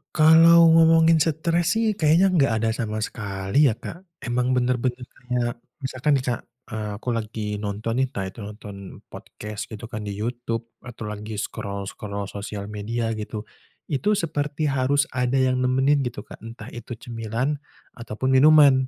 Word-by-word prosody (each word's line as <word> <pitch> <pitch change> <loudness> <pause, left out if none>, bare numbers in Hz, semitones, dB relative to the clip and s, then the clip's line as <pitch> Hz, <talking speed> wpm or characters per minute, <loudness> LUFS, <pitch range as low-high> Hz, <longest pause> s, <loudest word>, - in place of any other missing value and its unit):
Kalau 165 +1 +7
ngomongin 165 0 +6
stres 165 +4 +1
sih 225 -1 +2
kayaknya 160 +5 +5
enggak 140 -9 +3
ada 115 - +2
sama 110 -2 -3
sekali 100 +6 +1
ya 110 - +1
Kak. 165 - -8 0.2
Emang 125 +1 0
bener-bener 125 0 0
kayak 125 -1 -3 0.2
misalkan 135 +3 +1
nih 130 - 0
Kak, 120 - -3 0.3
eee, 110 -1 -3
aku 115 +4 -5
lagi 110 -2 -3
nonton 105 +3 -2
nih, 130 - +2
entah 100 -7 -5
itu 95 +4 -7
nonton 105 -1 -8 0.4
podcast 105 -1 -8
gitu 110 +1 -9
kan 105 -1 -5
di 100 - -4
YouTube 115 +1 -4
atau 115 -3 -7
lagi 105 +1 -6
scroll-scroll 100 0 -5
sosial 100 0 -6
media 115 +2 -2
gitu. 110 -1 -5 0.5
Itu 205 +10 +2
seperti 150 -3 -1
harus 140 +2 +2
ada 125 0 0
yang 130 -1 +2
nemenin 130 +3 +3
gitu 125 -5 -4
Kak. - - -12
Entah 115 +2 -10
itu 120 0 -7
cemilan 120 +4 -3 0.4
ataupun 115 +3 -2
minuman. 140 -3 +6
120 Hz, 155 wpm, -24 LUFS, 110-145 Hz, 0.5 s, Kalau